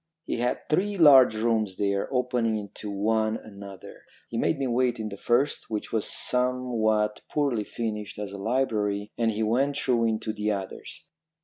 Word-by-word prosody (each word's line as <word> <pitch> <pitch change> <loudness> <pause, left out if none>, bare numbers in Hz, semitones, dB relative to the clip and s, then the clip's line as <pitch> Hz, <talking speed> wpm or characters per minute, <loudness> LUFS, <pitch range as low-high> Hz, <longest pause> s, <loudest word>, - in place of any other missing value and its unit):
He - - -2
had 120 +1 -2
three 200 +6 0
large 135 -8 +7
rooms 110 -3 0
there, 100 -1 -1
opening 125 -3 0
into 105 0 -7
one 110 +2 0
another. 100 -2 -11 0.3
He 115 - -4
made 160 - +1
me 135 - -1
wait 125 -1 +1
in 110 -1 -3
the 100 - -7
first, 125 +7 0
which 105 -2 -4
was 110 -2 0
somewhat 120 -4 0
poorly 140 -8 0
furnished 105 -2 -5
as 105 -1 -5
a 100 - -7
library, 105 -3 -1
and 115 -1 +1
he 110 0 -1
went 135 +6 +1
through 120 -4 +1
into 110 -1 -1
the 105 0 -2
others. 95 -2 -7
110 Hz, 170 wpm, -26 LUFS, 105-125 Hz, 0.3 s, large